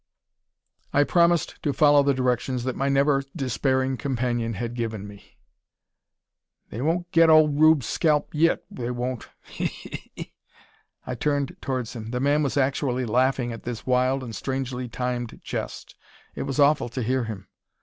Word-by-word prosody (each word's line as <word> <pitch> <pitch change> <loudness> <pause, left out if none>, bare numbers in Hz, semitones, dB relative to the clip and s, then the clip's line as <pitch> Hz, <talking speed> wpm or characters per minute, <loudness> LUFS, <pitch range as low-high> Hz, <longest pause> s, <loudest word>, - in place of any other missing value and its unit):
I 145 - +5
promised 170 +2 +2
to 145 - 0
follow 145 +1 +5
the 140 -1 +2
directions 125 0 0
that 130 0 -2
my 135 +1 0
never 140 0 +3
despairing 130 -1 0
companion 120 -4 -1
had 115 +4 -4
given 110 -4 -4
me. 100 -1 -15 1.3
"They 115 - -5
won't 175 +4 -1
get 165 0 +5
old 155 -2 +5
Rube's 155 -5 +5
scalp 150 +1 +1
yit, 165 +2 +2
they 120 -1 -4
won't. 125 0 -4
He! - - -5
he! - - -9
he!" - - -8 0.7
I 125 - -4
turned 140 +2 -1
towards 125 -3 -3
him. 110 -2 -7
The 125 +1 -2
man 145 +3 +2
was 145 -1 -1
actually 130 -2 0
laughing 125 +1 +1
at 115 - -7
this 120 -2 -6
wild 130 +1 +1
and 115 -3 -7
strangely 130 -2 -3
timed 125 -1 -3
jest. - - -6 0.4
It - - -4
was 135 - -2
awful 145 -3 +4
to 125 +1 -4
hear 130 +1 0
him. 100 -4 -7
130 Hz, 160 wpm, -25 LUFS, 120-145 Hz, 1.3 s, I